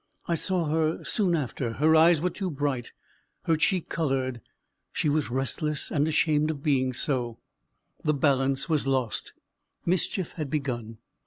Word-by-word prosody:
I 170 Hz, -, +1 dB
saw 175 Hz, +1 st, +1 dB
her 155 Hz, +1 st, 0 dB
soon 190 Hz, -6 st, +2 dB
after; 130 Hz, -5 st, -2 dB
her 155 Hz, +6 st, +4 dB
eyes 160 Hz, 0 st, +6 dB
were 180 Hz, +1 st, 0 dB
too 190 Hz, 0 st, -3 dB
bright, 140 Hz, -5 st, -2 dB, 0.5 s
her 165 Hz, -, +2 dB
cheek 180 Hz, +2 st, +1 dB
coloured; 130 Hz, -6 st, -1 dB, 0.5 s
she 150 Hz, -, 0 dB
was 150 Hz, -2 st, +1 dB
restless, 135 Hz, +4 st, -2 dB
and 150 Hz, 0 st, +2 dB
ashamed 155 Hz, -1 st, +2 dB
of 150 Hz, -3 st, -4 dB
being 130 Hz, -3 st, +2 dB
so; 125 Hz, -3 st, -1 dB, 0.7 s
the 150 Hz, -1 st, +2 dB
balance 135 Hz, -1 st, +1 dB
was 155 Hz, -4 st, +1 dB
lost; 130 Hz, -4 st, -1 dB, 0.5 s
mischief 185 Hz, 0 st, 0 dB
had 155 Hz, -4 st, -5 dB
begun. 120 Hz, -7 st, -3 dB
150 Hz, 150 wpm, -27 LUFS, 130-160 Hz, 0.7 s, eyes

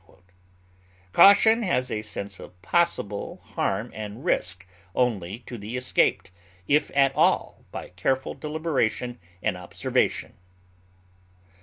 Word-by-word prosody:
Caution 220 Hz, +3 st, +7 dB
has 130 Hz, -, 0 dB
a 105 Hz, -, -1 dB
sense 100 Hz, -2 st, -6 dB
of 90 Hz, -, -12 dB
possible 105 Hz, -, 0 dB
harm 100 Hz, +5 st, -1 dB
and 110 Hz, +6 st, -7 dB
risk 90 Hz, -, 0 dB, 0.3 s
only 110 Hz, -3 st, -1 dB
to 120 Hz, -, -7 dB
be 110 Hz, +5 st, -5 dB
escaped, 125 Hz, -6 st, +1 dB, 0.4 s
if 150 Hz, +2 st, +3 dB
at 135 Hz, -1 st, +4 dB
all, -, -, +1 dB
by -, -, -7 dB
careful 130 Hz, +10 st, -1 dB
deliberation 130 Hz, -7 st, -2 dB, 0.2 s
and 110 Hz, -3 st, +1 dB
observation. 90 Hz, -1 st, -1 dB
120 Hz, 110 wpm, -25 LUFS, 100-140 Hz, 0.4 s, Caution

